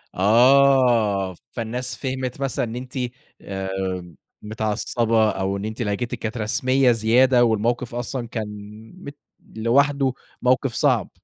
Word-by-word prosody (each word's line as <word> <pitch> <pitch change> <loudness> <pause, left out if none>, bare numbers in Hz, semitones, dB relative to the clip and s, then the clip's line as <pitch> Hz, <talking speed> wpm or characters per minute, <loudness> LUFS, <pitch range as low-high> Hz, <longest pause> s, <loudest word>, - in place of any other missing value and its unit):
آه. 115 -3 +4 0.2
فالناس 120 +2 -4
فهمِت 130 0 -4
مثلًا 130 -2 -1
إن 115 - -7
أنتِ 125 +1 -8 0.5
آآ 95 -3 -4 0.3
متعصبة 110 +1 0
أو 95 0 -2
إن 100 - -5
أنتِ 110 +2 -5
لهجتِك 110 +3 -2
كانت 115 +2 -4
رسمية 130 +4 +2
زيادة 120 +3 +4
والموقف 120 +2 -1
أصلًا 120 0 -4
كان 110 -2 -4 0.5
مت 145 -6 -10 0.4
لوحده 135 +4 +2 0.3
موقف 130 0 +1
صعب. - - +1
120 Hz, 115 wpm, -22 LUFS, 105-130 Hz, 0.5 s, آه